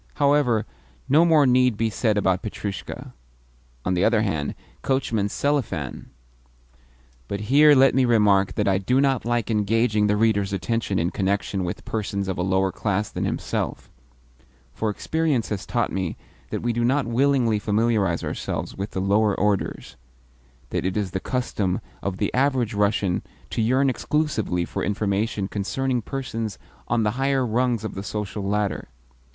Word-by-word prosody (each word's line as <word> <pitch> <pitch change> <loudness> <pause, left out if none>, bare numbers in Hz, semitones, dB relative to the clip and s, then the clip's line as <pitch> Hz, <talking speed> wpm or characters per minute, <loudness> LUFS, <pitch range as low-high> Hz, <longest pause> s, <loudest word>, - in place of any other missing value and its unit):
However, 140 -6 +3 0.4
no 150 +5 +5
more 160 -4 +5
need 125 -3 +3
be 115 0 0
said 105 +1 +1
about 95 -2 +2
Petrushka. 100 -2 -6 0.7
On 90 - +1
the 90 +1 +1
other 110 -1 +3
hand, 80 -8 -2 0.3
Coachman 115 -6 0
Selifan 130 - -2 1.2
But 100 +5 -4
here 150 +1 +7
let 135 0 +5
me 130 -1 +3
remark 105 -5 +3
that - - 0
I 95 -1 +3
do 125 +7 +1
not 135 -3 +2
like 120 -2 0
engaging 110 0 +2
the 105 0 +2
reader's 105 -3 +2
attention 100 +2 -1
in 85 +2 0
connection 100 0 -1
with 85 - -5
persons 100 -3 -2
of 95 -2 -3
a - - +1
lower 95 +1 +1
class 105 0 -1
than - - -2
himself; - - -3 0.8
for 110 - -1
experience 150 +2 -1
has 105 -2 -4
taught 120 -3 0
me 95 -3 -3 0.3
that - - -4
we 120 0 0
do 120 +1 0
not 135 +4 +2
willingly 120 -2 +2
familiarise 105 0 +1
ourselves - - -4
with 100 +2 -4
the 95 - -3
lower 100 +2 +2
orders 105 -1 -1 0.7
that - - -1
it 95 +2 -1
is 100 -3 -1
the 95 - -2
custom 105 -6 -1 0.2
of 95 -2 -3
the 100 - -1
average 130 -4 +1
Russian 100 -3 +1 0.3
to - - -1
yearn 130 +5 +3
exclusively 130 - 0
for - - -4
information 105 0 -1
concerning 125 +6 -1
persons 115 -4 -4 0.3
on 115 -1 +1
the 105 - +2
higher 135 -1 +2
rungs 120 0 0
of 110 - -4
the 95 - -5
social 105 +1 -4
ladder. 105 0 -1
110 Hz, 160 wpm, -24 LUFS, 100-125 Hz, 1.2 s, here